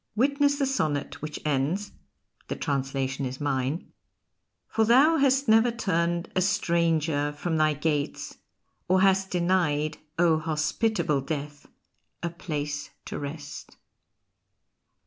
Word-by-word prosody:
Witness 285 +4 +3
the 280 - +1
sonnet 155 - -1
which 150 0 -5
ends 150 +8 0 0.6
(the - - -3
translation 135 -1 -2
is 130 0 -4
mine): 140 +2 -2 0.8
For 225 - +1
thou 270 +9 +5
has 275 -1 +3
never 225 +2 +5
turned 175 -7 -1
A 185 - +3
stranger 165 -5 +1
from 160 +2 -2
thy 155 -1 +3
gates 150 -1 -2 0.5
or 185 +1 +3
hast 190 0 +3
denied, 170 -4 +1 0.2
O 165 -2 +4
hospitable 155 +1 0
Death, 145 0 -5 0.6
a 170 - -1
place 150 -3 -4 0.2
to - - -5
rest. 145 +1 -8
160 Hz, 115 wpm, -27 LUFS, 145-190 Hz, 0.8 s, thou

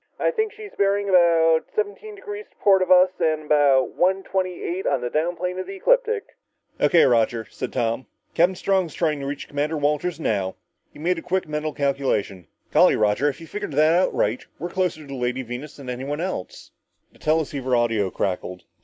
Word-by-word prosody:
"I - - +2
think 440 -3 -1
she's 420 -1 -11
bearing 200 0 +1
about 165 -3 +4
seventeen 430 0 -3
degrees 415 +1 -8
to - - -34
port 195 -2 +4
of 185 - 0
us, 185 0 +6
and 155 -1 +1
about 140 -4 +3
one 190 +2 +1
twenty 185 -2 -2
eight 185 +3 -3
on - - +1
the 120 - -3
down 165 +3 0
plane 180 +1 -3
of 185 - -5
the 195 - -7
ecliptic." 460 - +1 0.4
"O.K., 170 - +5
Roger," 115 -2 +2
said - - -5
Tom. 115 0 -1 0.3
"Captain 175 +3 +3
Strong's 185 -4 0
trying 155 -4 0
to 140 - -5
reach 140 0 -5
Commander 150 +2 -2
Walters 150 +4 -1
now." 100 -10 -1 0.4
He - - -16
made 170 +3 0
a - - -9
quick 185 0 -1
mental 150 0 -2
calculation. 135 - -1 0.2
"Golly, - - +5
Roger 105 +7 +2
if 145 - -7
you've 165 - -12
figured 185 -8 -5
it 160 +5 +4
right, 110 +4 0
we're 175 +4 -5
closer 180 -3 -1
to 150 - -12
the 140 - -7
Lady 125 0 -2
Venus 125 +5 -7
than 140 -3 -11
anyone 135 +4 -4
else!" 180 - -5 0.4
The - - -22
teleceiver 145 -5 0
audio 115 -5 +1
crackled. 90 -1 -3
155 Hz, 195 wpm, -23 LUFS, 130-185 Hz, 0.4 s, us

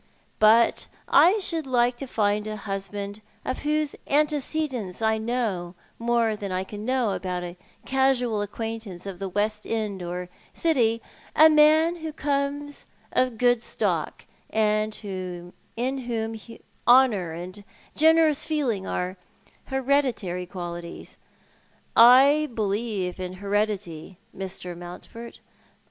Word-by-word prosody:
But 225 +2 +5 0.2
1 400 +5 +6
should 330 -5 -2
like 245 -1 +2
to 275 - -5
find 210 -2 0
a 215 - -4
husband 200 +1 -5 0.2
of 255 - -2
whose 300 0 -1
antecedents 290 - 0
I 220 0 +1
know 220 -7 -2 0.2
more 230 -1 +1
than 200 -2 -5
I 185 0 -1
can 205 +2 -8
know 255 -4 +1
about 180 -1 -3
a 175 0 -6 0.3
casual 260 -5 +1
acquaintance 215 -3 -5
of 195 -3 -7
the 195 -1 -4
West 210 +2 -1
End 215 -4 -2
or 180 +1 -4 0.3
City, 230 -9 +2 0.3
a 315 +1 +8
man 310 +3 +5
who 320 -1 -5
comes 285 0 -2 0.2
of 255 - +3
a 250 - -11
good 245 0 +3
stock, - - -2 0.2
and 215 0 +1 0.8
in 260 +3 -1
whom 225 -3 -3 0.5
honour 240 -9 +5
and 185 +4 -8 0.3
generous 320 -1 +4
feeling 255 -11 -1
are 180 +1 -3 0.5
hereditary 255 -10 0
qualities. 175 -2 -7 0.8
I 275 +6 +7
believe 205 -3 -2
in 185 0 -4
heredity, 200 -4 -2 0.2
Mr. 185 -2 -5
Mountford. 180 +7 -10
220 Hz, 120 wpm, -25 LUFS, 195-265 Hz, 0.8 s, a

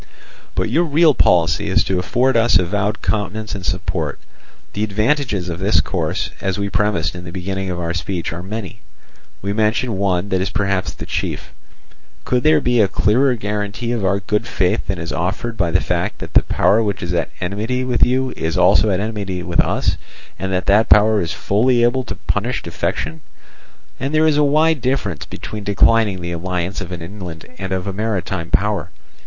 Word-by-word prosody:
"But - - -1
your 170 +2 +3
real 155 0 +4
policy 85 - +3
is - - +3
to 95 -1 0
afford 125 +8 +1
us 115 -2 +5
avowed 105 +4 -1
countenance 105 +1 -2
and 100 -3 -5
support. 90 +1 -2 0.5
The 105 - -1
advantages 110 - 0
of 85 -1 -4
this 95 -4 +3
course, 70 - -2
as 95 -1 -1
we 100 0 -2
premised 100 -6 0
in 90 -1 -8
the 85 - -8
beginning 95 +1 -3
of 90 -1 -3
our 85 -1 -2
speech, 85 -1 -3
are 85 - -5
many. 100 +1 -6 0.6
We 100 +1 -1
mention 110 0 0
one 95 -1 0
that 95 -1 +1
is 95 - -1
perhaps 100 -1 0
the - - -8
chief. - - -3 0.7
Could 125 - +1
there 155 +2 +5
be 120 -4 +2
a 100 - +4
clearer 125 +7 +2
guarantee 105 +2 -3
of 115 -4 -1
our 95 +1 +2
good 105 +3 -1
faith 90 -5 0
than 95 - -1
is 85 0 -4
offered 95 +7 -2
by 90 -5 +1
the 90 +2 +3
fact 90 +3 -1
that - - -8
the - - +7
power 110 +3 +2
which 100 -4 -2
is 85 0 -2
at 85 -1 0
enmity 110 +8 -2
with 125 -1 +2
you 130 +1 +1
is 80 +2 -2
also 95 +3 +5
at 95 -2 +1
enmity 100 -4 -3
with 85 -1 -2
us, - - +2 0.4
and 95 0 -2
that 90 0 0
that 105 +2 +4
power 105 0 +5
is 85 - -2
fully 120 +4 +2
able 125 +2 +2
to - - -5
punish 120 +5 -2
defection? 80 -2 -3 0.8
And 135 +4 -2
there 155 +1 +4
is 155 -2 +3
a 150 - +4
wide 155 +1 +3
difference 120 - -1
between 105 -1 -7
declining 100 -1 +3
the 85 0 -4
alliance 90 +2 -3
of 90 -1 -7
an 85 -2 -5
inland 85 -3 -8
and 95 -1 -4
of 95 -1 -1
a 100 - -3
maritime 95 -5 -2
power. 100 -4 0
100 Hz, 195 wpm, -19 LUFS, 90-115 Hz, 0.8 s, the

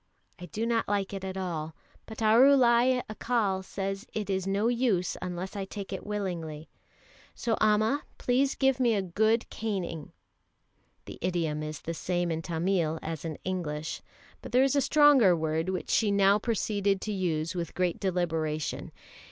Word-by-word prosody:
I 180 - -8
do 225 +3 -3
not 230 -1 0
like 200 -1 -1
it 195 -1 -5
at 190 0 -4
all, 165 -4 -4 0.3
but 220 0 -6
Arulai 250 +1 +5
Accal 215 -4 -1
says 195 +3 -4
it 210 -2 -3
is 190 0 -1
no 200 +3 +1
use 235 -7 +1
unless 180 +1 -5
I 200 - -2
take 195 0 -7
it 190 - -5
willingly, 170 -7 -4 0.7
so 230 -2 0
Amma, 215 +6 +3 0.2
please 265 +2 +1
give 270 -1 +2
me 240 -3 +3
a 200 - 0
good 220 +6 +1
caning." 185 -8 -4 0.9
(The - - -10
idiom 165 -4 -1
is 155 -1 -5
the 165 - -4
same 175 +1 -1
in 160 0 -2
Tamil 165 -1 0
as 160 -1 -5
in 160 -2 -4
English, 155 -5 -3 0.4
but - - -9
there 255 +2 +5
is 275 +1 +2
a 280 - +4
stronger 275 - +6
word 160 +1 -1
which 185 -1 -3
she 220 - +3
now 200 0 +4
proceeded 205 -3 0
to 215 - -3
use 170 -3 -1
with 170 -3 -4
great 180 -2 0
deliberation.) 160 -5 -2
195 Hz, 165 wpm, -28 LUFS, 170-220 Hz, 0.9 s, stronger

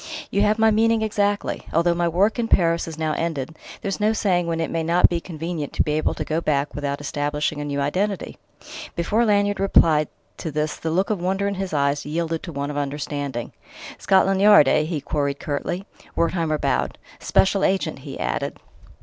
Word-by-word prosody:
"You 200 - +2
have 210 +1 +3
my 220 0 +4
meaning 225 +1 +3
exactly; 205 -1 0
although 170 +2 +3
my 170 0 0
work 195 +8 +2
in 230 - 0
Paris 170 -5 +2
is 160 -1 -7
now 155 -1 -1
ended, 160 -3 -3 0.3
there's 195 -1 -2
no 210 +1 +2
saying 180 -5 +1
when 165 -1 -1
it 165 - -2
may 165 - -1
not 170 +2 +4
be 175 - -1
convenient 165 -3 -5
to - - +2
be 150 - -2
able 155 +1 0
to - - -4
go 160 +1 -1
back 145 -2 0
without 140 -1 -3
establishing 145 +1 -2
a - - -4
new 140 -1 -2
identity." 185 +8 -2 0.6
Before 210 +7 +1
Lanyard 205 -1 +2
replied 160 -6 +4 0.3
to 160 - -4
this 150 0 -2
the 165 - -4
look 185 +6 +1
of 200 -5 -1
wonder 190 +2 0
in 200 - -1
his 190 -1 -4
eyes 140 -1 +1
had 145 - -8
yielded 165 0 -1
to 170 - -7
one 140 -1 -3
of 145 - -5
understanding. 140 -3 -3 0.5
"Scotland 190 0 +3
Yard, 205 -8 +7
eh?" 155 +2 +3
he 155 -2 -3
queried 140 -1 -1
curtly. 175 +6 -3 0.3
Wertheimer 165 -2 +1
bowed. - - -1 0.2
"Special 195 0 +2
agent," 185 -7 0
he 135 -1 -8
added. - - -2
165 Hz, 200 wpm, -23 LUFS, 150-195 Hz, 0.6 s, Yard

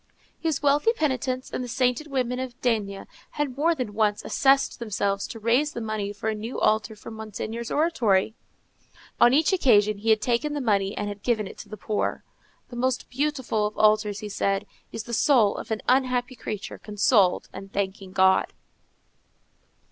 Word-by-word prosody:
His 320 -4 -1
wealthy 290 +11 +3
penitents 260 - -2
and - - -3
the - - -5
sainted 250 +4 0
women 255 -3 -1
of 255 -1 -6
D—— 205 -5 -1 0.3
had 290 -4 -2
more 325 +4 +2
than 245 -8 -4
once 210 -1 0
assessed 275 0 +2
themselves 200 -3 -1
to 225 - -8
raise 245 +7 +2
the - - -4
money 215 -3 -3
for 205 +2 -6
a 220 - +1
new 220 +4 -5
altar 215 0 +1
for 210 - -10
Monseigneur's 220 +1 -6
oratory; 225 - +2 0.9
on 240 - +7
each 310 +8 +3
occasion 215 - +3
he 225 +2 -2
had 220 -1 +5
taken 245 +7 0
the 295 - -2
money 200 -6 0
and 205 - -2
had 205 0 -6
given 220 -3 0
it - - -10
to 210 - -10
the 215 - -7
poor. 210 +1 -2 0.5
"The 245 - -9
most 255 0 -1
beautiful 260 -6 0
of 210 - -9
altars," 215 -1 +3
he 210 - -5
said, 195 0 -1 0.3
"is 225 - -5
the 235 - -8
soul 230 -4 +4
of - - -7
an 220 -1 -3
unhappy 255 -1 +2
creature 210 -5 -6
consoled 205 -2 +2
and 195 0 -9
thanking 195 -1 -3
God." 190 0 +3
225 Hz, 180 wpm, -25 LUFS, 205-260 Hz, 0.9 s, on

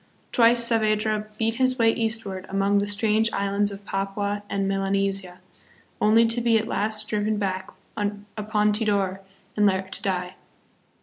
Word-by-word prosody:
Twice 235 -1 +4
Saavedra 215 -1 +1
beat 225 +1 0
his 255 0 +2
way 225 -2 +4
eastward 220 -5 -3
among 195 +1 +2
the 200 - -1
strange 215 +2 +1
islands 200 +1 +1
of 200 0 -10
Papua 200 +1 -2
and 195 -1 -1
Melanesia, 195 -1 -1 0.6
only 220 +2 +5
to 230 +1 +2
be 230 -1 +4
at 220 0 -2
last 215 -1 -1
driven 210 0 0
back 190 -2 -2 0.3
upon 210 0 -1
Tidor 200 -3 0 0.3
and 210 -1 +4
there 190 0 0
to 190 0 -9
die. 180 -2 -2
205 Hz, 145 wpm, -25 LUFS, 195-220 Hz, 0.6 s, only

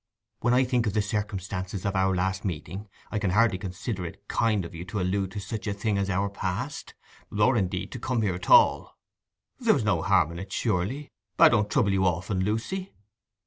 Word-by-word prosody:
'When 120 +1 +2
I 130 - +5
think 125 -3 +1
of 100 - -1
the 105 - +2
circumstances 100 -2 -3
of 100 0 -1
our 95 0 +2
last 95 +2 -1
meeting, 95 +3 -5 0.2
I 105 - -1
can 100 -3 0
hardly 105 0 +3
consider 95 +1 -4
it 100 +4 -9
kind 110 -5 +1
of 85 - -9
you 85 +1 -6
to 100 +3 -4
allude 95 +1 0
to 105 - -4
such 105 0 -5
a 100 - -1
thing 100 0 0
as 100 0 -1
our 100 +1 +1
past—or, 105 +2 -2
indeed, 95 -4 -1
to 125 - -6
come 120 -1 -1
here 100 -4 +1
at 90 +1 -6
all.' - - +5 0.6
'There - - +4
was - - 0
no - - +1
harm 75 - +3
in 85 - -7
it 95 +1 -8
surely? 115 +8 -1 0.3
I - - +8
don't 105 -3 +2
trouble 100 -1 +2
you 95 0 +2
often, 95 +2 0
Lucy. 115 - -3
100 Hz, 205 wpm, -27 LUFS, 95-110 Hz, 0.6 s, I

